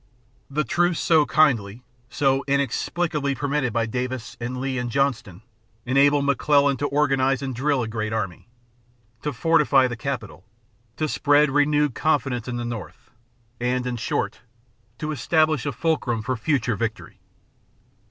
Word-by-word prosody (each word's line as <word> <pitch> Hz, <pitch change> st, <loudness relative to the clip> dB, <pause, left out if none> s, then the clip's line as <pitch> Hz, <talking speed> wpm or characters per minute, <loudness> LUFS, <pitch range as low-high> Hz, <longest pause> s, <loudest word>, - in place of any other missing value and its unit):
The 150 Hz, +2 st, 0 dB
truce 175 Hz, +6 st, +1 dB
so 160 Hz, -3 st, +3 dB
kindly, 120 Hz, -7 st, +2 dB, 0.3 s
so 135 Hz, +1 st, +1 dB
inexplicably 140 Hz, +1 st, -1 dB
permitted 140 Hz, -2 st, -1 dB
by 115 Hz, +1 st, 0 dB
Davis 125 Hz, +1 st, -4 dB
and 125 Hz, +2 st, -4 dB
Lee 130 Hz, -1 st, -2 dB
and 125 Hz, -1 st, -3 dB
Johnston 120 Hz, -7 st, -1 dB, 0.4 s
enabled 140 Hz, +2 st, +3 dB
McClellan 140 Hz, 0 st, +3 dB
to 145 Hz, +3 st, -1 dB
organize 135 Hz, -2 st, +1 dB
and 135 Hz, -1 st, -3 dB
drill 135 Hz, +1 st, 0 dB
a -, -, -4 dB
great 110 Hz, -1 st, -3 dB
army, 105 Hz, -2 st, -4 dB, 0.7 s
to 150 Hz, -, -2 dB
fortify 140 Hz, -1 st, +3 dB
the 120 Hz, -, -5 dB
capital, 115 Hz, -6 st, -5 dB, 0.5 s
to 155 Hz, -, 0 dB
spread 145 Hz, 0 st, +3 dB
renewed 145 Hz, -1 st, +2 dB
confidence 130 Hz, -5 st, 0 dB
in 125 Hz, -, -3 dB
the 120 Hz, -, -3 dB
North, 120 Hz, +2 st, -8 dB, 0.5 s
and, 125 Hz, +1 st, -1 dB
in 125 Hz, -1 st, -2 dB
short, 115 Hz, -, -2 dB, 0.6 s
to 155 Hz, -1 st, -4 dB
establish 155 Hz, +1 st, +1 dB
a -, -, 0 dB
fulcrum 125 Hz, -5 st, -1 dB
for 130 Hz, +2 st, -1 dB
future 125 Hz, -1 st, 0 dB
victory. 110 Hz, +2 st, -5 dB
135 Hz, 145 wpm, -23 LUFS, 120-145 Hz, 0.7 s, so